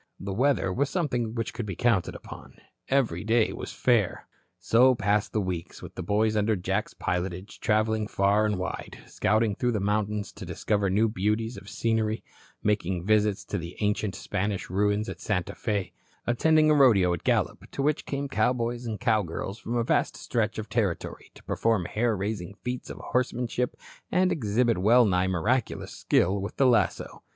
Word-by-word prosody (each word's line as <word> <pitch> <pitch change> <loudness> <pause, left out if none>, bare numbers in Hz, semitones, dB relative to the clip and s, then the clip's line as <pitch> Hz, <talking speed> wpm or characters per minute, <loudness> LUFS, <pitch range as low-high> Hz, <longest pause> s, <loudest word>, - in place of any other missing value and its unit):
The 95 0 -4
weather 125 -4 +1
was 140 +5 0
something 125 -10 -1
which 115 -2 -3
could 115 - -5
be 95 - -4
counted 115 -5 +1
upon. - - -11 0.3
Every 120 -11 +1
day 110 +1 +2
was - - -6
fair. 115 -7 +1 0.3
So 125 +3 +4
passed 105 -1 +1
the 110 - 0
weeks, 90 -4 -4
with - - -9
the - - -6
boys 105 +4 +1
under 105 +1 +2
Jack's 95 +3 -2
pilotage 90 +2 -3
travelling 110 -1 +1
far 100 +1 +2
and 105 -2 -1
wide, 95 -1 -5
scouting 110 -1 +1
through 120 +4 0
the 105 - 0
mountains 105 +1 -1
to - - -10
discover 100 -2 -1
new 105 +4 +3
beauties 110 +3 -1
of - - -10
scenery, 110 -1 0 0.4
making 95 -4 0
visits 105 -1 +2
to 100 - -3
the 85 +1 -8
ancient 105 -2 0
Spanish 100 0 -3
ruins 105 +2 +1
at - - -7
Santa 90 -5 -1
Fe, 105 -5 -2 0.3
attending 155 +5 +4
a - - +6
rodeo 110 -11 +5
at 85 - -5
Gallup, - - 0
to 135 - -3
which 150 +1 0
came 140 0 -2
cowboys 120 0 0
and 110 -2 -4
cowgirls 105 -3 -1
from 115 - -4
a 120 - +2
vast - - +1
stretch 115 -2 -1
of 110 0 -4
territory 105 -5 -2
to - - -16
perform 110 -6 0
hair 110 +3 0
raising 100 -1 -4
feats 125 0 -4
of - - -7
horsemanship 125 0 -1 0.4
and 185 0 +3
exhibit 115 - +1
well 115 +6 +5
nigh 90 -2 +2
miraculous 100 +7 -1
skill 95 +3 +1
with 100 - -6
the 135 - +4
lasso. 120 -3 +1
110 Hz, 175 wpm, -27 LUFS, 100-120 Hz, 0.4 s, a